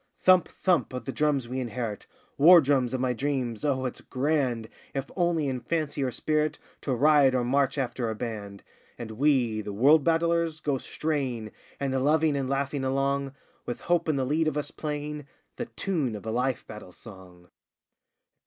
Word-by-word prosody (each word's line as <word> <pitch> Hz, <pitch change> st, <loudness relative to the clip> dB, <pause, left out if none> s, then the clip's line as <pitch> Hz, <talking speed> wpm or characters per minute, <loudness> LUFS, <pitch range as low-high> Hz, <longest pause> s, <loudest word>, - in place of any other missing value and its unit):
Thump! 185 Hz, -2 st, +5 dB
thump! 175 Hz, -9 st, 0 dB
of 125 Hz, -, -5 dB
the 135 Hz, -, -3 dB
drums 145 Hz, -4 st, 0 dB
we 130 Hz, +2 st, -3 dB
inherit 120 Hz, -4 st, -4 dB, 0.3 s
War 170 Hz, +5 st, +8 dB
drums 130 Hz, -4 st, +1 dB
of -, -, -2 dB
my 125 Hz, -1 st, +1 dB
dreams! 130 Hz, -3 st, -2 dB
Oh 135 Hz, -3 st, 0 dB
it's 125 Hz, -, -4 dB
grand, 130 Hz, -5 st, -1 dB, 0.3 s
If 135 Hz, 0 st, -3 dB
only 170 Hz, -4 st, +1 dB
in 130 Hz, -2 st, -2 dB
fancy 150 Hz, 0 st, -2 dB
or 130 Hz, -, +1 dB
spirit, 155 Hz, +5 st, 0 dB, 0.2 s
To 130 Hz, -, -1 dB
ride 140 Hz, 0 st, +5 dB
or 125 Hz, -, +1 dB
march 135 Hz, +3 st, +1 dB
after 125 Hz, -3 st, -2 dB
a 110 Hz, -, -3 dB
band! 105 Hz, -3 st, -6 dB, 0.3 s
And 115 Hz, -2 st, -7 dB
we, 120 Hz, -3 st, +2 dB
the 105 Hz, 0 st, -6 dB
World 140 Hz, +8 st, +5 dB
Battlers, 165 Hz, 0 st, +1 dB
go 145 Hz, -3 st, -1 dB
straying 130 Hz, -10 st, -3 dB, 0.3 s
And 135 Hz, -2 st, -1 dB
loving 155 Hz, +1 st, +3 dB
and 135 Hz, -2 st, -2 dB
laughing 140 Hz, 0 st, -1 dB
along 135 Hz, +1 st, 0 dB, 0.3 s
With 120 Hz, -, -4 dB
Hope 170 Hz, -2 st, +1 dB
in 155 Hz, -, +2 dB
the 135 Hz, -1 st, 0 dB
lead 155 Hz, +4 st, +1 dB
of 150 Hz, -1 st, -1 dB
us 150 Hz, -, -3 dB
playing 150 Hz, -1 st, -5 dB, 0.3 s
The 240 Hz, -, -4 dB
tune 155 Hz, -, -2 dB
of 105 Hz, -, -9 dB
a 110 Hz, -, -2 dB
life 125 Hz, +2 st, -1 dB
battle 105 Hz, -4 st, -10 dB
song! 90 Hz, -5 st, -14 dB
135 Hz, 180 wpm, -27 LUFS, 125-150 Hz, 0.3 s, War